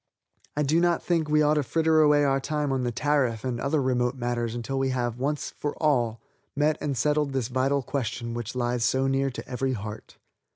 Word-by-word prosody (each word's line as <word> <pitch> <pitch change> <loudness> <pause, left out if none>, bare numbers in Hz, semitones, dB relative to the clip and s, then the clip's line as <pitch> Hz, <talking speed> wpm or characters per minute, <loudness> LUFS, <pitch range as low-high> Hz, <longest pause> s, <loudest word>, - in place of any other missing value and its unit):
I 150 - +2
do 155 +4 +2
not 175 0 +2
think 165 -3 0
we 150 0 +4
ought 150 0 +4
to 150 - +2
fritter 160 +3 +2
away 150 -1 +5
our 135 -1 +2
time 150 +1 -2
on 135 -1 0
the 120 -1 -1
tariff 130 -4 0
and 125 -2 -2
other 140 +3 +1
remote 125 -1 +1
matters 120 -2 -2
until 135 +3 -3
we 135 0 +1
have, 120 -2 -2
once 145 +3 -2
for 145 - -4
all, 120 -7 +1 0.4
met 150 +2 +2
and 140 -3 -2
settled 150 +2 +1
this 130 -3 -1
vital 135 +2 +1
question 120 -2 -3
which 120 +1 -5
lies 120 -1 0
so 130 +3 +2
near 135 0 +1
to 130 - -8
every 130 +1 -1
heart. 105 -1 -7
135 Hz, 210 wpm, -26 LUFS, 120-150 Hz, 0.4 s, away